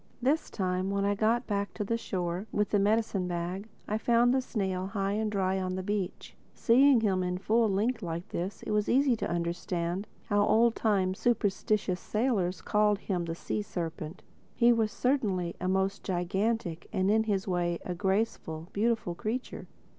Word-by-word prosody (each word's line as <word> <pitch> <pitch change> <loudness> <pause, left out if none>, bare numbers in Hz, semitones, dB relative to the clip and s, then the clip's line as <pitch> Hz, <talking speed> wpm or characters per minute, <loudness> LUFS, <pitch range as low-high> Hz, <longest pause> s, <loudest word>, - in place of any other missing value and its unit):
This 280 +6 +1
time 185 -1 -1
when 200 0 0
I 200 - +2
got 225 +4 +1
back 200 -1 -2
to 210 - -2
the 230 +3 -1
shore—with 195 0 -2
the 205 - +3
medicine 205 -2 +1
bag—I 190 +5 -4
found 240 +2 +4
the 265 - +2
snail 190 -6 -2
high 195 0 -1
and 215 +1 -1
dry 190 -1 0
on 185 0 -2
the 185 - -3
beach. 200 -2 -3 0.2
Seeing 255 +1 +5
him 195 -4 +1
in 180 0 -1
his 190 - -15
full 225 0 +3
length 220 +5 0
like 170 -1 -4
this, 185 +4 -4
it - - -4
was 210 -1 +1
easy 265 0 +4
to - - -3
understand 170 +2 -2 0.2
how 205 -1 +2
old 230 +2 +4
time, 195 -4 +1
superstitious 205 -3 0
sailors 195 -6 0
had - - -25
called 210 -1 +3
him 185 -4 -2
the 165 0 -4
Sea 210 - -3
serpent. 165 -3 -5 0.3
He 240 -1 +5 0.2
certainly 215 -7 0
was - - -13
a 185 - -1
most 190 +1 0
gigantic, 185 0 -1
and 195 -1 +1
in 220 +1 +3
his 205 -1 -1
way, 175 -2 0
a 180 - -2
graceful, 190 -4 -1
beautiful 220 -4 0
creature. 225 +8 -4
200 Hz, 175 wpm, -29 LUFS, 180-220 Hz, 0.3 s, Seeing